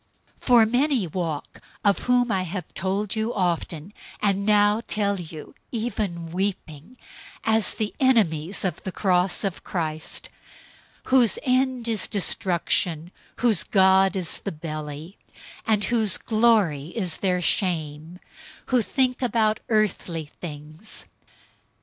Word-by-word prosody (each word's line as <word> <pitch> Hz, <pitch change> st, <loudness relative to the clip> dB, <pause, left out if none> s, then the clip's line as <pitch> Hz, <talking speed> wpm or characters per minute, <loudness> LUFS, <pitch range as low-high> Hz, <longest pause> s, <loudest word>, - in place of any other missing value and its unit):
003:018 -, -, -20 dB
For 240 Hz, -3 st, +7 dB
many 250 Hz, 0 st, +1 dB
walk, 165 Hz, -3 st, -4 dB, 0.2 s
of 200 Hz, -1 st, +4 dB
whom 245 Hz, -1 st, +2 dB
I 185 Hz, -1 st, -2 dB
told 195 Hz, +3 st, -2 dB
you 220 Hz, +1 st, -1 dB
often, 175 Hz, -1 st, -2 dB, 0.3 s
and 200 Hz, 0 st, 0 dB
now 210 Hz, +1 st, +4 dB
tell 200 Hz, -2 st, 0 dB
you 160 Hz, -3 st, -9 dB, 0.2 s
even 205 Hz, -8 st, -3 dB
weeping, 185 Hz, -, -4 dB, 0.5 s
as 220 Hz, -2 st, +3 dB
the 215 Hz, -1 st, -2 dB
enemies 195 Hz, -, +2 dB
of 185 Hz, -, -2 dB
the 190 Hz, -, -5 dB
cross 180 Hz, 0 st, +1 dB
of 195 Hz, -3 st, -3 dB
Christ, 155 Hz, -3 st, -3 dB, 0.7 s
003:019 -, -, -14 dB
whose 250 Hz, -5 st, +4 dB
end 255 Hz, -2 st, +1 dB
is 220 Hz, -4 st, +1 dB
destruction, 175 Hz, -3 st, 0 dB, 0.2 s
whose 225 Hz, -8 st, +3 dB
god 190 Hz, 0 st, +4 dB
is 180 Hz, -4 st, 0 dB
the -, -, -4 dB
belly, 155 Hz, +2 st, -7 dB, 0.5 s
and 215 Hz, -2 st, +2 dB
whose 220 Hz, -3 st, +2 dB
glory 215 Hz, -11 st, +2 dB
is 185 Hz, -8 st, -2 dB
in -, -, -26 dB
their 185 Hz, -2 st, +2 dB
shame, 160 Hz, -3 st, -1 dB, 0.6 s
who 250 Hz, -, +5 dB
think 255 Hz, +3 st, 0 dB
about 225 Hz, -4 st, +1 dB
earthly 185 Hz, -7 st, 0 dB
things. 155 Hz, +5 st, -7 dB
195 Hz, 125 wpm, -24 LUFS, 170-220 Hz, 0.7 s, For